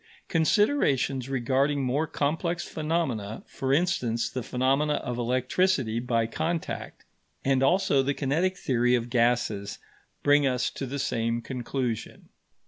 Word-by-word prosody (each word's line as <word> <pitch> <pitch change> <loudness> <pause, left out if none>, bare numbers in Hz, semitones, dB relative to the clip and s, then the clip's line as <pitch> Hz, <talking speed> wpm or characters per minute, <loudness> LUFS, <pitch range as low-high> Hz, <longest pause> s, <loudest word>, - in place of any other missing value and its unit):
Considerations 160 - +2
regarding 135 +2 +1
more 140 +5 0
complex 170 +5 -1
phenomena, 150 -10 -2
for 135 0 -3
instance 135 -8 +1
the 130 - -3
phenomena 135 +5 +1
of 125 -4 -4
electricity 130 +1 +1
by 120 -2 0
contact, 160 +8 -4 0.4
and 135 -1 +3
also 145 -2 +3
the 140 +1 -1
kinetic 165 +7 0
theory 125 -1 +2
of 120 0 -3
gases, 115 -4 +1 0.5
bring 145 -1 +4
us 125 -2 0
to 135 - -5
the 140 +3 -4
same 115 -3 -1
conclusion. 125 -1 -4
135 Hz, 125 wpm, -27 LUFS, 120-150 Hz, 0.5 s, bring